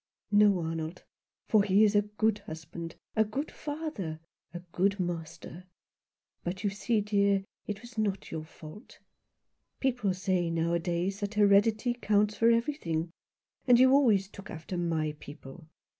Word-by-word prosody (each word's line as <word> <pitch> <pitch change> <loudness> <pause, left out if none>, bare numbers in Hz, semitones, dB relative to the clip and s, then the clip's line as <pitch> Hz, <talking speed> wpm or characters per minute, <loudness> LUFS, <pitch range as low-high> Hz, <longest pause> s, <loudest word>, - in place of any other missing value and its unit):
" - - -50
No, 205 -3 +5
Arnold, 165 +1 -4 0.4
for 215 -3 +5
he 200 +1 +4
is 210 -1 +3
a 205 - +6
good 210 +1 0
husband, 165 -2 -8 0.2
a 220 - +4
good 240 +8 -4
father, 290 - -5 0.3
a 175 +1 -7
good 195 +3 +1
master. 175 0 -5 0.8
But 185 +3 -4
you 205 - +1
see, 215 +2 0
dear, 200 -1 +2 0.2
it 205 -1 -4
was 240 -2 -8
not 200 -3 -2
your 160 -1 -4
fault. 155 +7 -13 0.8
People 245 -8 0
say 185 -2 0
nowadays 170 +3 -1
that 205 0 -4
heredity 210 +3 +4
accounts 210 -3 +1
for 230 - +4
everything; 230 - 0 0.6
and 245 -1 +7
you 260 0 +6
always 225 -9 +4
took 200 0 -12
after 160 +3 -6
my 160 -3 -1
people. 145 +2 -11
200 Hz, 145 wpm, -29 LUFS, 170-215 Hz, 0.8 s, and